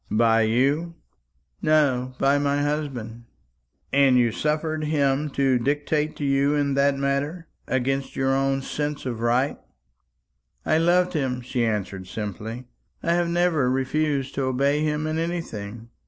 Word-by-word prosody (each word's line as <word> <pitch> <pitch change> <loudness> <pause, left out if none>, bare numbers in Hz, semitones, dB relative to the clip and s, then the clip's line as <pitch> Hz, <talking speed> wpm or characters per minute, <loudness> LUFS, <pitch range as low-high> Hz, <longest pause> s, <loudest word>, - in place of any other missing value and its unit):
"By 115 0 +3
you?" 145 +8 +1 0.7
"No; 130 -5 +2
by 140 +1 +3
my 145 0 +1
husband." 130 -6 -3 0.7
"And 135 -2 +5
you 120 -2 +3
suffered 155 +4 -1
him 145 -1 +1
to 135 -2 +3
dictate 150 +3 0
to 145 - -4
you 140 +1 +2
in 140 -1 +1
that 140 0 +2
matter. 140 +5 -2 0.2
Against 135 +1 -1
your 135 0 +1
own 135 0 +1
sense 145 0 -3
of 120 -3 -3
right?" 120 +4 +1 1.1
"I 155 - +3
loved 180 +2 +3
him," 130 -5 -1
she 120 0 -2
answered 100 -4 -2
simply. 110 +4 -6 0.4
"I 170 - +2
have 175 0 +1
never 170 -6 +2
refused 135 +1 0
to 135 - -1
obey 140 +3 +1
him 150 0 -1
in 155 +1 -1
anything. 115 -10 -5
140 Hz, 140 wpm, -24 LUFS, 125-150 Hz, 1.1 s, And